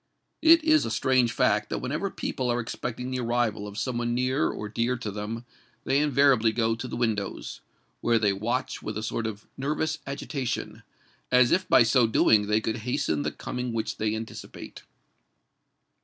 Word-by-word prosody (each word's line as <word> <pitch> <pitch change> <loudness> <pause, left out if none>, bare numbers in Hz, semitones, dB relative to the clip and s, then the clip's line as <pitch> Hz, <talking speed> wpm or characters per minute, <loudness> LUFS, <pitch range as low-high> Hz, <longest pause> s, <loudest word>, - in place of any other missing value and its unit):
It 325 0 +7
is 310 -1 +4
a - - -2
strange 130 -3 +2
fact - - +1
that - - -2
whenever - - -2
people 125 -1 -3
are 120 - 0
expecting 125 +2 -4
the 130 - -2
arrival 115 -3 0
of 100 0 -9
some 120 0 -2
one 120 0 -1
near 130 +3 +1
or 105 - -5
dear 115 +4 -1
to 110 -4 -5
them, 105 +4 -5 0.4
they 135 - +2
invariably 140 -6 +4
go 115 0 +1
to 115 - -5
the - - -5
windows, 110 -4 -2 0.4
where 120 -1 +2
they 105 -3 +2
watch 115 +6 -2
with 105 - -5
a 110 - -4
sort 115 0 -2
of 105 -1 -7
nervous 155 +3 -1
agitation—as 130 -2 -2
if 185 0 +1
by - - +7
so 120 0 +4
doing 105 -1 +4
they 105 +1 +2
could 110 +1 -2
hasten 110 -10 -1
the - - -2
coming 125 -1 -5
which 110 -1 -2
they 110 0 0
anticipate. 110 0 -8
120 Hz, 175 wpm, -27 LUFS, 110-130 Hz, 0.4 s, It